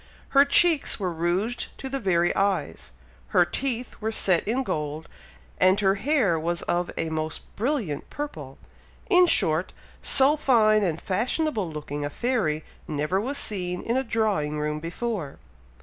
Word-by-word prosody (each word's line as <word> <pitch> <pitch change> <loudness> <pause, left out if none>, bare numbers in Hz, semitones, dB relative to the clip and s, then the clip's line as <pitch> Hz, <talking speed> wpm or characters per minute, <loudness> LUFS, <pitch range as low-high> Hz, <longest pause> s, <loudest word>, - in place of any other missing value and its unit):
Her 280 0 +5
cheeks 315 -1 +3
were 185 -3 -2
rouged 180 +8 -1
to 270 - -6
the 270 +1 -3
very 175 -5 +1
eyes, 195 0 -1 0.5
her - - +6
teeth 250 -3 -4
were 220 +1 -1
set 185 -5 +3
in 250 +5 0
gold, 150 - -4 0.5
and 185 +1 +4
her 195 -2 +3
hair 210 - +1
was 170 +2 -2
of 175 0 -1
a 165 - -2
most 155 0 -3
brilliant 225 - -2
purple; 155 - -7 0.5
in 360 -1 +6
short, 160 - +3 0.3
so 275 +2 +6
fine 220 -7 +3
and 170 -5 -1
fashionable 220 - -1
looking 145 -1 -5
a 145 - -2
fairy 160 - -1 0.2
never 150 +6 -1
was 275 +6 -3
seen 180 -3 -3
in 235 - -1
a 265 - +1
drawing 210 - -1
room 150 0 -2
before. 170 -2 -4
195 Hz, 150 wpm, -25 LUFS, 160-245 Hz, 0.5 s, her